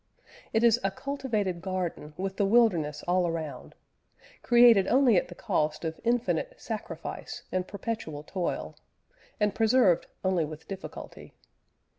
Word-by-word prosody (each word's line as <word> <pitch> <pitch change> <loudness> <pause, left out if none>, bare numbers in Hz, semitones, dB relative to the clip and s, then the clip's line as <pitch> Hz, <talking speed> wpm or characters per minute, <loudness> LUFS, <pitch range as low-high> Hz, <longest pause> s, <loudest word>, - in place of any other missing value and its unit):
It 225 - +2
is 235 0 +5
a 195 - +2
cultivated 220 -7 -2
garden 180 -5 -4
with 190 +1 -3
the 200 - +2
wilderness 175 -10 +3
all 180 0 +2
around; 160 -6 -5 0.7
created 235 -5 +6
only 255 -3 +5
at 180 - +2
the 175 - -11
cost 155 0 -1
of 160 0 -4
infinite 245 - 0
sacrifice - - -6
and 185 0 -1
perpetual 200 -8 -5
toil, 175 +2 -3 0.6
and 210 -1 +2
preserved 220 -6 +3 0.2
only 185 -3 +2
with 155 +1 -8
difficulty. 195 -1 -9
190 Hz, 130 wpm, -28 LUFS, 170-230 Hz, 0.7 s, created